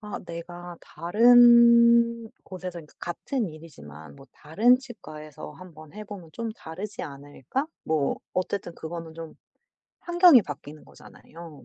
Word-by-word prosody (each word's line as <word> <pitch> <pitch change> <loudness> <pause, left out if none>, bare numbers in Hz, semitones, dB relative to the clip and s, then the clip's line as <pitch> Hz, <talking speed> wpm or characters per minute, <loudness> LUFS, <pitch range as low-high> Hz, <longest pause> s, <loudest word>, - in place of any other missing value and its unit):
'아 210 -1 -7
내가 175 +1 -9
다른 235 +4 +5
곳에서 180 -2 -8
이 - - -14
그러니까 - - -25
같은 220 - -4
일이지만 80 - -13
뭐 135 - -16
다른 220 +12 +2
치과에서 155 - -11
한번 155 -4 -14
해 215 +1 -9
보면 195 -6 -11
좀 230 +4 -5
다르지 200 0 -8
않을까?' 145 - -6 0.2
뭐 155 -3 0 0.2
어쨌든 185 -1 -3
그거는 165 0 -8
좀 165 -1 -9 0.7
환경이 345 - +5
바뀌는 150 -1 -10
거잖아요. 165 -3 -15
175 Hz, 290 characters per minute, -25 LUFS, 155-235 Hz, 0.7 s, 다른